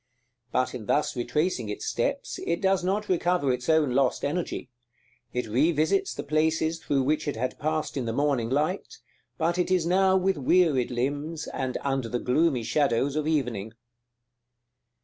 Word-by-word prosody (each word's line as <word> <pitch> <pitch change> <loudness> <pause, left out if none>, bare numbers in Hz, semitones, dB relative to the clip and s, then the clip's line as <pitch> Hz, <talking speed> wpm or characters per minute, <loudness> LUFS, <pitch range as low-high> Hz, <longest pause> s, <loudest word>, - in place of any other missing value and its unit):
But 130 - 0
in 110 -5 -7
thus 150 0 +1
retracing 125 - -1
its 105 - -5
steps, - - -2
it 170 - 0
does 190 -2 +2
not 200 +3 0
recover 175 -6 +1
its 125 +2 -4
own 160 -4 +4
lost 130 0 +1
energy. 145 -4 -3 0.6
It 125 0 -2
revisits 155 - +1
the - - -4
places 160 +2 +1
through 140 -4 0
which 150 +3 0
it 145 - -1
had 125 +3 -3
passed 155 +1 -1
in 130 -3 -2
the 115 - -1
morning 130 -2 0
light, 150 +8 -1 0.4
but 170 +2 0
it 180 - +1
is 185 -3 +2
now 190 +2 +4
with 190 -1 +1
wearied 145 -3 +3
limbs, 145 +6 -2
and 130 -1 -3
under 135 -4 -1
the 125 - -1
gloomy 130 +1 +1
shadows 140 0 +1
of 155 0 -1
evening. 120 -9 -1
150 Hz, 165 wpm, -27 LUFS, 125-170 Hz, 0.6 s, own